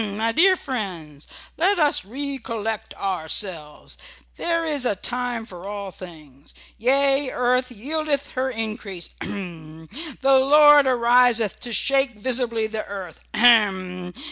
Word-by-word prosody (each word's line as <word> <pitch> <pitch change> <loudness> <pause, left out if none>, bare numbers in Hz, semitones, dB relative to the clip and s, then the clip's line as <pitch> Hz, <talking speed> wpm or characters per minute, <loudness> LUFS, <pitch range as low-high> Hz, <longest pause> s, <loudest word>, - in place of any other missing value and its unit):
"H - - -1
m! 200 0 -6
my 225 +1 0
dear 370 +9 +5
friends, 180 - -6 0.3
let 375 +5 +2
us 300 - +2
recollect 230 -2 -5
ourselves. 165 -4 -3 0.4
There 335 -1 -1
is 295 -4 0
a 240 -5 +1
time 245 +2 -2
for 185 -2 -9
all 200 -2 -6
things. 155 -7 -13 0.2
Yea, 275 +3 +2
earth 250 +1 0
yieldeth 285 +4 -3
her 260 +1 -1
increase 215 -6 -5
h - - -3
m! 160 -5 -8 0.3
The 270 0 +5
Lord 295 +1 +6
ariseth 240 -3 +3
to 240 - -6
shake 270 +1 +2
visibly 235 -1 0
the 220 0 -4
earth 190 -4 -8 0.2
ahem! 190 -6 +3
230 Hz, 135 wpm, -23 LUFS, 195-270 Hz, 0.4 s, Lord